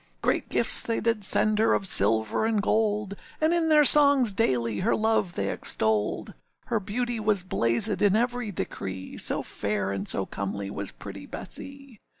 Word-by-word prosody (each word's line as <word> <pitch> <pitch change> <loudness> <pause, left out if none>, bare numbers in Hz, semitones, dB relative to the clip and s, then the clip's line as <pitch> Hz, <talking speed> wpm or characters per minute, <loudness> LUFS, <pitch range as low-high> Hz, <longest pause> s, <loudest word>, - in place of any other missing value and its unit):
Great - - -1
gifts - - +4
they 230 - -1
did 225 -2 -1
send 215 +2 +1
her 220 - +3
of 195 - -3
silver 110 - +4
and 220 -1 0
gold, 210 -2 -1 0.3
And 315 +2 +1
in 335 -2 0
their 305 -1 +5
songs 280 -6 +5
daily 120 - -1
her 220 - 0
love 220 -5 -1
they 100 0 -2
extolled: 110 -1 -1 0.3
Her 225 - -1
beauty 235 +4 -4
was 210 -3 0
blazèd 185 - +1
in 205 -1 +3
every 245 0 -1
decree, 95 - -5
So - - +2
fair 100 -1 -3
and 100 +1 -5
so 95 - -1
comely 100 0 -6
was 100 0 -5
pretty 100 -1 -11
Bessee. 275 -5 -9
205 Hz, 165 wpm, -25 LUFS, -, 0.3 s, their